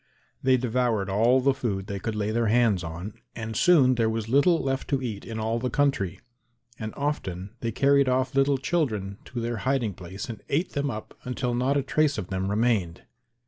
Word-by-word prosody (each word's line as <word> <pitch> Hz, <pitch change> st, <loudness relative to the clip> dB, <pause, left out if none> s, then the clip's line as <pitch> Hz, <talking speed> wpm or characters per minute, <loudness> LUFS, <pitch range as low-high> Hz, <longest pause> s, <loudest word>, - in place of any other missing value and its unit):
They 130 Hz, 0 st, +4 dB
devoured 120 Hz, -5 st, 0 dB
all 120 Hz, +6 st, +4 dB
the 135 Hz, +1 st, +3 dB
food 110 Hz, -8 st, -3 dB
they 100 Hz, -1 st, -4 dB
could 110 Hz, +3 st, -3 dB
lay 105 Hz, 0 st, -1 dB
their 115 Hz, 0 st, +1 dB
hands 110 Hz, -5 st, +3 dB
on 85 Hz, +5 st, -6 dB, 0.2 s
and 110 Hz, -1 st, -5 dB
soon 140 Hz, -6 st, +5 dB
there 115 Hz, -2 st, +1 dB
was 110 Hz, -1 st, -2 dB
little 145 Hz, +8 st, +4 dB
left 135 Hz, 0 st, -2 dB
to 140 Hz, -, +1 dB
eat 115 Hz, -6 st, -5 dB
in 115 Hz, -, -6 dB
all 110 Hz, +2 st, 0 dB
the 125 Hz, +1 st, -1 dB
country; 135 Hz, -, 0 dB, 0.6 s
and 110 Hz, -1 st, -4 dB
often 100 Hz, -10 st, -3 dB
they 115 Hz, -, -2 dB
carried 140 Hz, +2 st, +3 dB
off 130 Hz, 0 st, +1 dB
little 135 Hz, 0 st, +3 dB
children 110 Hz, -, -1 dB
to 120 Hz, -, -5 dB
their 120 Hz, 0 st, -2 dB
hiding 125 Hz, -3 st, 0 dB
place 95 Hz, +2 st, -7 dB
and 115 Hz, -3 st, -7 dB
ate 165 Hz, +6 st, 0 dB
them 140 Hz, -1 st, -1 dB
up 110 Hz, -3 st, -7 dB
until 125 Hz, -1 st, -2 dB
not 130 Hz, +4 st, +1 dB
a 140 Hz, -, +1 dB
trace 150 Hz, +1 st, +1 dB
of 95 Hz, -4 st, -4 dB
them 95 Hz, 0 st, -2 dB
remained. 105 Hz, -6 st, 0 dB
120 Hz, 200 wpm, -26 LUFS, 105-135 Hz, 0.6 s, soon